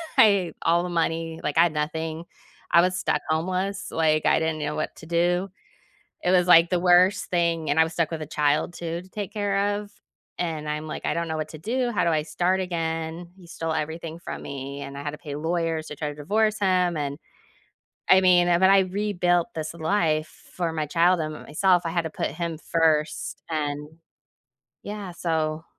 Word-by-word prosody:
I 200 -9 +4
all 170 +1 +3
the 180 - -4
money, 165 -1 -1
like, 150 0 -2
I 165 - +8
had 170 -3 +1
nothing, 160 +2 -3 0.5
I 170 - +7
was 180 +1 +1
stuck - - 0
homeless, 185 +5 -1
like, 155 -1 +2
I - - +4
didn't 160 -1 -1
know 150 0 -2
what 155 - -3
to 160 - -12
do. 175 +3 +1 0.7
It 180 - +1
was, 180 -1 +4
like, 170 -1 +7
the 180 - +1
worst 180 +3 +4
thing, 170 -3 0
and 145 +2 +2
I - - +8
was 165 - -6
stuck 165 -1 0
with 160 -1 -4
a - - -4
child 150 +2 0
too, 170 0 -4
to 185 - -16
take 205 0 -5
care 205 -1 0
of, 210 -1 -10 0.5
and 160 -3 -3
I'm 150 +1 -3
like, 155 - -6
"I - - +1
don't 170 0 -2
know 160 - -2
what 155 0 -3
to 155 - -9
do, 240 - -1
how 205 - +1
do - - +2
I 155 -2 +1
start 175 +4 0
again?" 165 -1 -3
He 180 -2 -15
stole 165 -1 -4
everything 160 +1 -4
from - - -7
me, 140 0 -6
and 140 0 -7
I 140 - -6
had 145 - -3
to 150 - -8
pay 145 -3 -7
lawyers 165 0 -1
to 150 - -7
try 150 +1 -3
to 145 - -7
divorce 215 +8 0
him, 180 -3 +2
and, 140 -1 -3 0.9
I 190 - +8
mean, 180 -1 +5
eh 170 -1 +4
but 190 +1 +5
I 195 0 +7
rebuilt 185 -3 +1
this 155 -1 -4
life, 160 -2 -1
for 170 -3 -1
my 155 -1 -1
child 170 +3 +3
and 155 -1 -2
myself, 175 +4 +1
I - - -1
had 170 +1 0
to 160 - -5
put - - -2
him 170 -2 -4
first, 160 -2 0
and, 150 -2 -2 1.0
yeah 205 -2 -6
so 160 -2 -2
165 Hz, 210 wpm, -25 LUFS, 155-180 Hz, 1.0 s, I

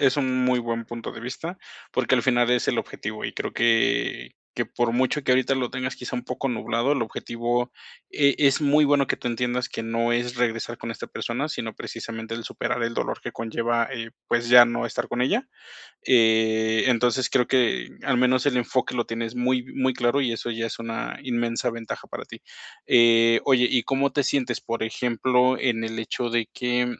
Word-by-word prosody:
es 135 0 +3
un 130 -2 +1
muy 125 -1 +3
buen 115 0 -3
punto 115 -1 -6
de 110 - -9
vista 165 +9 -6 0.3
porque 130 0 +2
al 120 - +2
final 120 -2 +3
es 125 -1 +2
el - - +1
objetivo, - - -5
y - - -7
creo - - -4
que 115 - +1 0.2
que - - -1
por 120 -1 -1
mucho 130 +4 +1
que 125 - +3
ahorita 130 +1 +2
lo 125 -2 -2
tengas, 130 0 -4
quizá, 125 0 -6
un 125 0 -3
poco 130 +2 -3
nublado, 120 +2 0
el 140 - 0
objetivo 120 +2 -2 0.4
e 140 -2 +3
es 140 0 +3
muy 150 +1 +4
bueno 140 -1 +3
que - - 0
tú - - -8
entiendas 125 +1 -1
que 115 - -5
no 115 +1 0
es 120 +1 -1
regresar 120 -1 -1
con 115 - -6
esta 115 - -6
persona, 130 +6 -3
sino 115 -7 -4
precisamente, 115 0 -6
el 115 - -6
superar 120 -1 -3
el 115 0 -1
dolor - - -3
que - - -6
conlleva, 115 +1 -1
eh, 115 -3 -5 0.2
pues, 120 0 0
ya 120 -1 +10
no 120 0 -2
estar 115 - -3
con 120 +1 -1
ella, 235 - 0 0.6
eh, 110 -2 +3
entonces, 125 0 +2
creo 125 -2 +2
que 120 - +1
al 135 -3 +2
menos 125 +2 +3
el 130 -3 +2
enfoque 125 +1 0
lo 120 -1 0
tienes 115 +1 -4
muy 125 0 0
muy 130 -1 +1
claro, 120 +3 +1
y 120 -3 0
eso 115 +1 -4
ya 115 0 -3
es - - -6
una 115 0 -5
inmensa 120 -1 -1
ventaja 115 -1 -7
para - - -6
ti, - - -12 0.5
eh, 115 -1 +5
oye, 125 -3 +4
¿y 120 - +3
cómo 135 +1 0
te 145 - +1
sientes, 125 -4 -1
por 115 -1 -3
ejemplo, 125 +2 +1
en 115 -3 0
el 115 0 -4
hecho 120 +2 -3
de 115 -1 0
que? 125 0 0
120 Hz, 205 wpm, -24 LUFS, 115-130 Hz, 0.6 s, ya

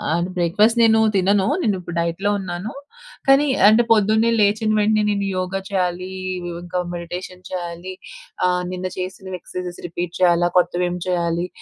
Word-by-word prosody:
అంటే, 170 +1 -1
బ్రేక్‌ఫా‌స్ట్ 210 +7 +3
నేనూ 220 -1 +5 0.2
తినను. 195 +1 +3 0.2
నేనిప్పుడు 185 - -2
డైట్‌లో 170 +4 -1
ఉన్నాను, 185 +3 -5 0.6
కానీ 275 +2 +6 0.2
అంటే, 220 +3 +6
పొద్దున్నే 220 +1 +4
లేచిన 210 +1 +2
వెంటనే 215 0 +2
నేను 200 -1 0
యోగా 185 +1 -2
చెయ్యాలీ 180 -1 -1 0.3
వ్ - - -5 0.2
ఇంకా 180 +1 -3
మెడిటేషన్ 180 +1 -7
చెయ్యాలి. 175 0 -5 0.5
ఆహ్, 180 0 0
నిన్న 185 0 -3
చేసినవి 185 0 -5
ఎక్సర్‌సైజెస్ 180 0 -7
రిపీట్ 175 0 -5
చెయ్యాలా? 175 -1 +4
కొత్తవేమి 180 0 +1
చెయ్యాలి? 170 -1 0
185 Hz, 140 wpm, -21 LUFS, 175-205 Hz, 0.6 s, కానీ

